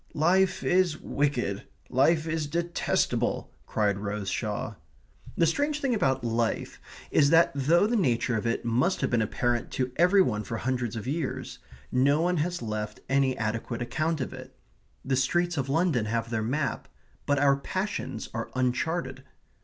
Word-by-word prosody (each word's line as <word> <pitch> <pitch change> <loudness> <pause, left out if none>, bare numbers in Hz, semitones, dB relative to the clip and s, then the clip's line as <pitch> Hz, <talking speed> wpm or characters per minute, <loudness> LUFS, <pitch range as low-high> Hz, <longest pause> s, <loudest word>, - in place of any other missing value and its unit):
"Life 185 +4 +3
is 180 -3 +2
wicked 125 -9 -1 0.2
life 155 +5 +3
is 160 -2 -2
detestable," 170 +2 -1
cried 100 -2 0
Rose 100 -1 -3
Shaw. 105 +2 -3 0.6
The 170 - +4
strange 290 - 0
thing 270 -4 0
about 135 - +1
life 115 -1 -1 0.3
is 140 -2 +4
that 165 +1 +5
though 155 +7 +3
the 235 +3 +1
nature 125 - +1
of 110 +1 -1
it 115 - -1
must 125 +11 +1
have - - 0
been 120 -2 +3
apparent 120 +2 -1
to 130 -1 -1
every 180 +3 +5
one 105 -7 -1
for 115 +3 -4
hundreds 120 -1 -2
of 115 - -5
years, 140 +1 -3 0.3
no 140 +4 +3
one 175 +2 +1
has 175 -1 -1
left 105 -1 -4
any 135 -1 +2
adequate 115 +2 -2
account 155 +5 -1
of 130 - -4
it. - - -11 0.5
The 130 0 +1
streets 175 +7 +1
of 135 -2 -2
London 155 -6 +2
have 115 +1 -2
their 110 -1 0
map; 130 +3 -2 0.4
but 145 - +2
our 140 0 +4
passions 140 - -3
are 115 - -4
uncharted. 130 +2 -1
135 Hz, 160 wpm, -27 LUFS, 115-165 Hz, 0.6 s, that